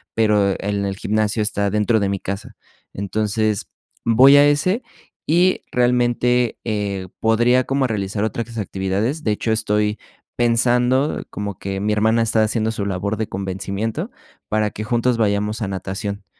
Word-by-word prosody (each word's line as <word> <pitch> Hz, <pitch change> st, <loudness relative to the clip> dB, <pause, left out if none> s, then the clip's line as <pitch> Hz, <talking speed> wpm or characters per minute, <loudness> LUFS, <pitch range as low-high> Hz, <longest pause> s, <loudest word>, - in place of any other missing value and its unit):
pero 105 Hz, -3 st, +3 dB
en 100 Hz, 0 st, -2 dB
el 95 Hz, -1 st, -3 dB
gimnasio 110 Hz, +1 st, 0 dB
está 100 Hz, -1 st, 0 dB
dentro 105 Hz, +2 st, +2 dB
de 100 Hz, -, +1 dB
mi 100 Hz, -1 st, -2 dB
casa, 100 Hz, +4 st, -6 dB, 0.4 s
entonces, 105 Hz, +1 st, -1 dB, 0.4 s
voy 130 Hz, +5 st, +7 dB
a 145 Hz, -, +7 dB
ese 185 Hz, -, +1 dB, 0.4 s
y 180 Hz, +4 st, +3 dB
realmente, 125 Hz, -1 st, +2 dB
eh, 100 Hz, -4 st, -2 dB
podría 120 Hz, +3 st, +3 dB
como 135 Hz, -1 st, +1 dB
realizar 100 Hz, -1 st, -2 dB
otras 115 Hz, +1 st, -4 dB
actividades, 100 Hz, +9 st, -2 dB
de 110 Hz, -, +1 dB
hecho, 110 Hz, +2 st, -1 dB
estoy 105 Hz, -1 st, 0 dB, 0.4 s
pensando, 125 Hz, +3 st, +2 dB
como 100 Hz, -2 st, -5 dB
que 95 Hz, 0 st, -4 dB
mi 105 Hz, +2 st, 0 dB
hermana 110 Hz, +2 st, +2 dB
está 110 Hz, -1 st, +2 dB
haciendo 110 Hz, 0 st, 0 dB
su 105 Hz, -2 st, -3 dB
labor 100 Hz, +2 st, -2 dB
de 110 Hz, 0 st, -2 dB
convencimiento, 100 Hz, -, -3 dB, 0.4 s
para 105 Hz, -1 st, +1 dB
que 110 Hz, -, -6 dB
juntos 120 Hz, +1 st, +1 dB
vayamos 105 Hz, +1 st, 0 dB
a 105 Hz, -, -1 dB
natación, 100 Hz, +2 st, -5 dB
110 Hz, 150 wpm, -20 LUFS, 100-120 Hz, 0.4 s, voy